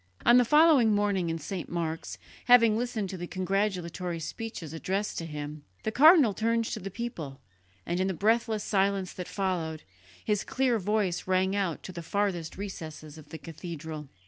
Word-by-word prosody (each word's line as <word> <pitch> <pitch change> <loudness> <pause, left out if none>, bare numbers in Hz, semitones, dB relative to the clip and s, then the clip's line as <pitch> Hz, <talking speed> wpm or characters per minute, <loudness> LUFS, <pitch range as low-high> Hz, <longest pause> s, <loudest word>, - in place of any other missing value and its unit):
On 240 +1 +7
the 250 - +5
following 295 -6 +5
morning 200 -4 +1
in 165 - -1
St. 170 +3 -5
Mark's, 165 -2 -3 0.3
having 230 -3 +6
listened 230 -3 -2
to 190 - -5
the 175 0 -5
congratulatory 185 -2 -2
speeches 165 -2 -6
addressed 195 +5 -2
to 165 - -5
him, 150 -1 -6 0.2
the 220 - -1
cardinal 290 - +7
turned 230 +2 0
to - - -4
the 195 - -6
people, 175 - -6 0.5
and 175 +1 -1
in 190 - +1
the 190 - -2
breathless 220 +2 +1
silence 195 -2 0
that 180 - -6
followed, 175 -5 -2 0.4
his 210 -2 +1
clear 255 -3 +1
voice 200 -3 -1
rang 190 +1 +2
out 190 -5 -1
to - - -7
the 170 -1 -7
farthest 175 -2 -2
recesses 160 -6 -7
of 150 - -15
the 160 - -7
cathedral. 160 -3 -7
190 Hz, 170 wpm, -28 LUFS, 165-220 Hz, 0.5 s, On